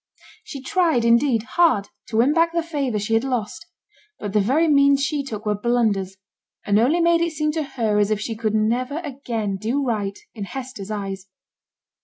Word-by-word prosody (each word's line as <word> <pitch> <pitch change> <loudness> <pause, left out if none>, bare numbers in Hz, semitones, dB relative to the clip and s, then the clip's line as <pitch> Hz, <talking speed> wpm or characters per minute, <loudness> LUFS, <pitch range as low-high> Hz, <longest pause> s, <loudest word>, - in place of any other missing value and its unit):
She 275 -2 -8
tried, 330 - +1
indeed, 235 -1 +3
hard 255 - +2 0.2
to 220 - -3
win 255 +6 +4
back 335 0 +2
the 335 -1 0
favour 285 -8 -2
she 210 +2 -2
had 225 +1 +3
lost; 260 +5 -3 0.5
but 205 -2 -5
the 210 - +4
very 280 +11 +2
means 280 -2 +4
she 290 -2 -1
took 220 -5 -7
were 210 - +1
blunders, 210 -4 0 0.5
and 205 0 +3
only 280 +10 +3
made 340 0 +3
it 335 -1 0
seem 305 0 0
to 315 +1 -2 0.2
her 215 -3 +1
as 205 0 +2
if 215 -1 0
she 225 +1 -4
could 220 -1 -1
never 245 +6 0
again 235 - -3
do 240 +8 -1
right 205 -5 -2 0.2
in 210 -4 -6
Hester's 245 -4 -7
eyes. 195 -2 -5
235 Hz, 190 wpm, -22 LUFS, 210-285 Hz, 0.5 s, win